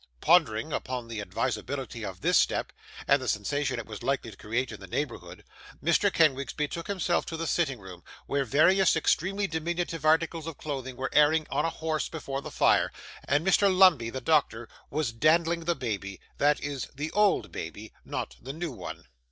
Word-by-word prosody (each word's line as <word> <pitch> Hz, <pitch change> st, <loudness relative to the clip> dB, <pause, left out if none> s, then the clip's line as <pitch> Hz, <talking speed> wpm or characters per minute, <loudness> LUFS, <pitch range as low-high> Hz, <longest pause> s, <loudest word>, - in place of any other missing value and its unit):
Pondering 150 Hz, -, +3 dB
upon 125 Hz, -2 st, -3 dB
the 115 Hz, -2 st, -5 dB
advisability 130 Hz, +3 st, -3 dB
of 95 Hz, -3 st, -6 dB
this -, -, +2 dB
step, -, -, +2 dB, 0.3 s
and 140 Hz, 0 st, +4 dB
the 130 Hz, -, -5 dB
sensation 140 Hz, +7 st, -1 dB
it 120 Hz, -, -5 dB
was 105 Hz, -3 st, -8 dB
likely 135 Hz, -4 st, -1 dB
to -, -, -13 dB
create 115 Hz, +5 st, -2 dB
in 110 Hz, -, -8 dB
the 95 Hz, -, -10 dB
neighbourhood, 95 Hz, -8 st, -5 dB, 0.4 s
Mr. -, -, +2 dB
Kenwigs 140 Hz, -4 st, +2 dB
betook 155 Hz, +3 st, -3 dB
himself 180 Hz, -3 st, 0 dB
to 165 Hz, -, -4 dB
the 165 Hz, -, -3 dB
sitting 155 Hz, -6 st, 0 dB
room, 95 Hz, -4 st, -12 dB, 0.2 s
where 140 Hz, 0 st, 0 dB
various 165 Hz, -, +4 dB
extremely 190 Hz, +5 st, +1 dB
diminutive 165 Hz, -1 st, -3 dB
articles 160 Hz, +1 st, +2 dB
of 165 Hz, -, -6 dB
clothing 130 Hz, -4 st, -5 dB
were 130 Hz, -, -3 dB
airing 155 Hz, +1 st, +4 dB
on -, -, +1 dB
a -, -, +1 dB
horse 160 Hz, -1 st, -2 dB
before 140 Hz, -4 st, -5 dB
the -, -, -7 dB
fire, -, -, +3 dB, 0.3 s
and 145 Hz, +4 st, +1 dB
Mr. 195 Hz, +1 st, +4 dB
Lumbey, 180 Hz, -11 st, +5 dB
the 130 Hz, +2 st, -5 dB
doctor, 125 Hz, -6 st, +1 dB, 0.2 s
was 145 Hz, -5 st, -1 dB
dandling 165 Hz, +6 st, +2 dB
the 170 Hz, 0 st, +1 dB
baby 100 Hz, -7 st, -4 dB, 0.2 s
that 145 Hz, +1 st, +3 dB
is, 145 Hz, -3 st, -4 dB
the 150 Hz, +3 st, -4 dB
old 200 Hz, -, +2 dB
baby 105 Hz, +7 st, -7 dB
not -, -, -5 dB
the 135 Hz, +3 st, -6 dB
new 165 Hz, 0 st, -4 dB
one. 120 Hz, -, -8 dB
145 Hz, 185 wpm, -28 LUFS, 120-165 Hz, 0.4 s, Lumbey